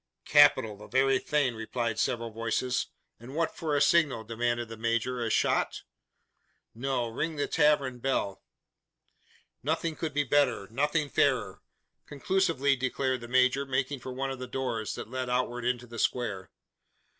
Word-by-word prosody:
"Capital! 105 Hz, -2 st, +5 dB
the 105 Hz, -, -12 dB
very 135 Hz, +1 st, +3 dB
thing!" 145 Hz, -4 st, +1 dB
replied 115 Hz, 0 st, -3 dB
several 115 Hz, -2 st, -1 dB
voices. 115 Hz, +3 st, -1 dB, 0.3 s
"And 125 Hz, +5 st, -10 dB
what 165 Hz, 0 st, 0 dB
for 155 Hz, -3 st, -1 dB
a 145 Hz, -, +2 dB
signal?" 155 Hz, -9 st, +3 dB
demanded 120 Hz, +1 st, -1 dB
the 115 Hz, -, -8 dB
major. 115 Hz, +2 st, -1 dB
"A 115 Hz, -, -1 dB
shot?" -, -, +1 dB, 0.9 s
"No. 125 Hz, 0 st, -1 dB
Ring 155 Hz, +8 st, -3 dB
the 145 Hz, -, 0 dB
tavern 140 Hz, -4 st, +2 dB
bell!" 110 Hz, -7 st, -1 dB, 1.2 s
"Nothing 160 Hz, +3 st, -1 dB
could 155 Hz, -3 st, -4 dB
be 145 Hz, -, +3 dB
better 140 Hz, -7 st, +2 dB
nothing 150 Hz, +5 st, +1 dB
fairer," 125 Hz, -9 st, +1 dB, 0.5 s
conclusively 145 Hz, -2 st, +1 dB
declared 130 Hz, 0 st, -1 dB
the 120 Hz, -, -8 dB
major, 130 Hz, +2 st, +3 dB
making 135 Hz, 0 st, -1 dB
for 130 Hz, -, -7 dB
one 135 Hz, +1 st, -3 dB
of 135 Hz, -, -6 dB
the 130 Hz, -, -5 dB
doors, 120 Hz, -5 st, -3 dB
that 110 Hz, -, -8 dB
led 130 Hz, -1 st, -3 dB
outward 125 Hz, -1 st, -1 dB
into 125 Hz, 0 st, -1 dB
the 120 Hz, -1 st, -9 dB
square. 105 Hz, -7 st, -1 dB
130 Hz, 155 wpm, -29 LUFS, 115-140 Hz, 1.2 s, Capital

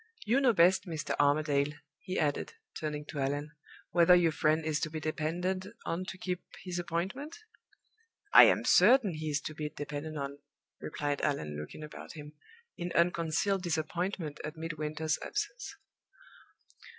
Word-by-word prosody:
You 240 Hz, +6 st, +3 dB
know 260 Hz, -3 st, +5 dB
best, 185 Hz, 0 st, +4 dB
Mr. 160 Hz, -3 st, -3 dB
Armadale," 145 Hz, 0 st, +2 dB, 0.3 s
he 185 Hz, 0 st, -4 dB
added, 145 Hz, -, 0 dB, 0.2 s
turning 150 Hz, -1 st, -4 dB
to 150 Hz, -, -6 dB
Allan, 145 Hz, +2 st, -1 dB, 0.4 s
"whether 175 Hz, +1 st, +6 dB
your 170 Hz, -2 st, +4 dB
friend 155 Hz, +1 st, +1 dB
is 155 Hz, -1 st, 0 dB
to 155 Hz, -, -2 dB
be 155 Hz, 0 st, -4 dB
depended 175 Hz, +5 st, -2 dB, 0.2 s
on 175 Hz, +3 st, -2 dB
to 185 Hz, -, -7 dB
keep 180 Hz, -1 st, -3 dB, 0.2 s
his 180 Hz, -1 st, -3 dB
appointment?" 190 Hz, -, -3 dB, 1.0 s
"I -, -, +11 dB
am -, -, +3 dB
certain 210 Hz, 0 st, +6 dB
he 155 Hz, 0 st, -4 dB
is 145 Hz, 0 st, +1 dB
to 155 Hz, -, -5 dB
be 150 Hz, -1 st, -4 dB
depended 150 Hz, +1 st, -5 dB
on," 140 Hz, 0 st, -5 dB, 0.4 s
replied 145 Hz, -1 st, -3 dB
Allan, 80 Hz, -, -1 dB
looking 75 Hz, -, -7 dB
about 150 Hz, -, -9 dB
him 150 Hz, -1 st, -10 dB, 0.4 s
in 175 Hz, 0 st, -4 dB
unconcealed 170 Hz, +3 st, +2 dB
disappointment 170 Hz, -1 st, -2 dB
at 155 Hz, +1 st, -6 dB
Midwinter's 155 Hz, -1 st, -2 dB
absence. 425 Hz, +4 st, -4 dB
160 Hz, 150 wpm, -31 LUFS, 150-180 Hz, 1.0 s, I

